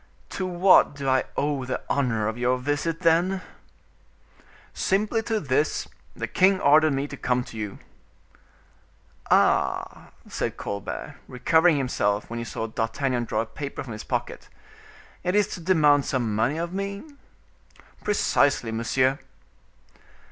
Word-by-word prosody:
"To 185 - -3
what 180 -3 +5
do 140 -1 -5
I 130 0 +2
owe 145 -2 0
the 130 0 -3
honor 120 -6 0
of 110 - -2
your 125 +1 +1
visit, 145 +5 -2
then?" 175 +3 +2 1.3
"Simply 210 +4 0
to 225 -1 -1
this: 145 0 0 0.3
the - - -3
king 190 +1 +3
ordered 155 0 +5
me 135 +1 -1
to 145 - -8
come 125 -2 0
to 120 - -12
you." 105 -3 -5 1.5
"Ah!" - - +2 0.2
said - - -3
Colbert, 100 -1 -6
recovering 160 +6 +3
himself 105 -6 -1
when 115 - -3
he 115 - -4
saw 115 - -4
D'Artagnan 120 +3 -2
draw 110 -1 -1
a - - -3
paper 140 +4 -6
from 120 -4 -7
his 105 - -7
pocket; - - -4 0.7
"it 180 +2 0
is 210 -1 +4
to - - -6
demand 150 -5 +4
some 120 -5 -1
money 120 +8 +1
of 170 +1 -3
me?" 200 +1 -4 1.0
"Precisely, 145 - +2
monsieur." 130 +4 +1
140 Hz, 140 wpm, -25 LUFS, 120-170 Hz, 1.5 s, what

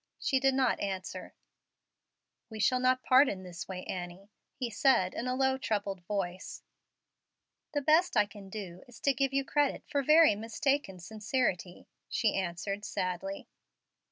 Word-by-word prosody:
She 265 - +1
did 270 0 +2
not 260 -2 +2
answer. 190 -2 -5 1.1
"We 220 -1 -8
shall 255 +5 +3
not 255 0 +2
part 260 +2 +6
in 190 -1 -5
this 180 -2 -8
way, 185 -1 -6
Annie," 180 +3 -7 0.2
he 245 -3 -4
said, 225 -6 +3
in 245 - -4
a 255 - 0
low, 265 0 +1
troubled 205 -6 -2
voice. 185 -3 -4 1.1
"The 290 -1 -1
best 315 -1 +3
I 210 - +5
can 200 -1 -12
do 190 -4 -7
is 245 - -14
to 280 - +3
give 270 0 0
you 275 0 0
credit 290 -1 +1
for 285 - 0
very 305 0 +6
mistaken 225 0 -1
sincerity," 200 -1 -2 0.2
she 220 -3 +1
answered, 195 +2 -3
sadly. 185 0 -4
215 Hz, 155 wpm, -31 LUFS, 190-265 Hz, 1.1 s, part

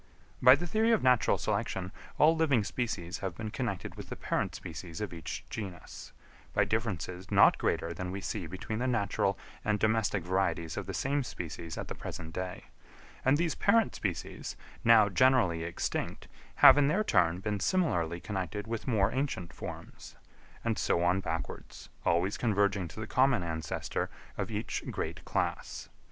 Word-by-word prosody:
By 125 +1 +9
the 175 - -4
theory 220 +6 +2
of 220 - +2
natural 125 -2 +4
selection 95 -1 -2 0.3
all 160 +2 +6
living 145 -9 +3
species 100 -6 -3
have 95 -3 -4
been 110 +1 -5
connected 110 -9 -3
with - - -9
the - - -4
parent - - -2
species 85 +2 -7
of 105 -4 -4
each 80 -2 -6
genus, 95 -6 -7 0.4
by - - +3
differences 95 -5 -3
not - - +6
greater 85 - 0
than 90 +2 -5
we 95 +2 -4
see 90 -3 -4
between 95 +6 -5
the 130 - 0
natural 100 -4 +1 0.3
and 105 0 +1
domestic 110 -3 +1
varieties 90 -3 0
of 100 -2 -4
the 95 - -4
same 140 +2 0
species 85 - -6
at - - -4
the - - -4
present 80 -1 -7
day; 90 0 -4 0.6
and 135 +3 +4
these 165 -1 +1
parent 225 +1 +3
species, 90 -7 -4 0.3
now 115 -2 +7
generally 110 -6 +3
extinct, 85 +1 -3 0.3
have - - +9
in 140 - +4
their 185 +9 +2
turn 85 - +3
been 105 +1 -2
similarly 90 - +1
connected 100 +2 -4
with 115 +1 -4
more 105 -4 +2
ancient 130 - -2
forms; - - -9 0.5
and - - 0
so 85 - +2
on 90 +2 +3
backwards, 85 -4 -5
always 85 +4 +1
converging 100 -5 +1
to 95 - -10
the 110 - -3
common 130 -4 +3
ancestor 80 -2 -3 0.3
of - - -3
each - - -3
great - - -4
class. - - -2
100 Hz, 165 wpm, -31 LUFS, 90-125 Hz, 0.6 s, By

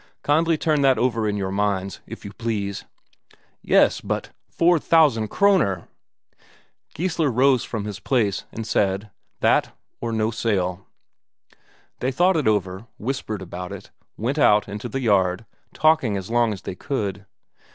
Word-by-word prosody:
Kindly 160 +2 +2
turn 150 -2 +1
that 135 -2 +4
over 115 -3 +1
in 105 - -2
your 95 -1 -2
minds, 100 -1 -1
if - - -9
you 100 - -8
please." 100 -3 -3 0.8
"Yes, - - +3
but - - -3 0.2
four 170 0 +3
thousand 145 -10 +3
Kroner!" 175 - +2 1.1
Geissler 165 -2 0
rose 130 +1 +3
from 105 -2 -4
his 105 -2 -6
place, 110 -7 0
and 115 - -6
said: 100 0 0 0.3
"That, - - +2 0.2
or 115 - -3
no 110 0 0
sale." 95 -5 -1 1.1
They 130 - 0
thought 180 +7 +3
it 150 -6 +1
over, 95 0 0
whispered 110 -4 -4
about 90 0 -7
it, - - -9 0.3
went 130 +7 -2
out 105 -7 +4
into 105 +1 -6
the 135 - -3
yard, 100 -2 +2 0.3
talking 155 -10 +2
as 95 +3 -6
long 120 -1 +3
as 100 -2 -6
they - - -5
could. 100 -5 -4
110 Hz, 150 wpm, -23 LUFS, 100-135 Hz, 1.1 s, that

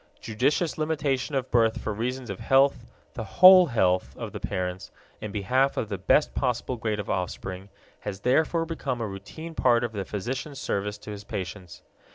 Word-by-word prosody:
Judicious 140 +9 0
limitation 150 -3 -1
of 130 -1 -2
birth 115 -2 +3
for 105 - -3
reasons 125 +2 -3
of 100 - -7
health, 135 +1 +3 0.3
the - - -5
whole 185 - +8
health 95 -8 +1
of - - -6
the - - -6
parents, 90 0 -4 0.3
in 105 - -5
behalf 130 +7 +1
of 110 - -2
the 100 - -3
best 150 +10 +3
possible 125 -1 -1
grade 110 -2 -2
of 100 - -5
offspring 95 +1 -4 0.3
has 95 -2 -6
therefore 160 +7 +2
become 145 -6 -3
a 115 - -2
routine 105 +12 -8
part 120 -5 +3
of 120 - -2
the 100 -3 -3
physician's 130 +9 -5
service 105 -5 -2
to 105 - -9
his 100 -1 -7
patients. 95 -2 -7
115 Hz, 180 wpm, -26 LUFS, 100-135 Hz, 0.3 s, whole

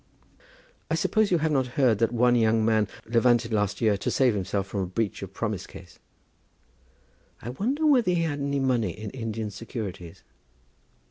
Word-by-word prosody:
"I - - +1
suppose 220 -2 +1
you 175 - +3
have 160 0 0
not 135 -3 +1
heard 125 -7 +3
that 115 -1 +2
one 120 +1 +3
young 110 -1 +3
man 110 -2 +2 0.2
levanted 115 0 +2
last 105 -1 0
year 110 -3 +3
to - - -2
save 130 -4 +3
himself 100 0 -2
from 100 0 -5
a 95 - 0
breach 100 +3 -2
of 95 -1 -7
promise 105 -2 -4
case?" - - -13 1.4
"I 120 - -7
wonder 255 - -1
whether 255 -9 +4
he 175 -2 +2
had 145 -3 -2
any 140 0 -1
money 120 -9 0
in 110 -1 -6
Indian 115 -3 -4
securities?" 100 -6 -7
115 Hz, 175 wpm, -26 LUFS, 105-135 Hz, 1.4 s, whether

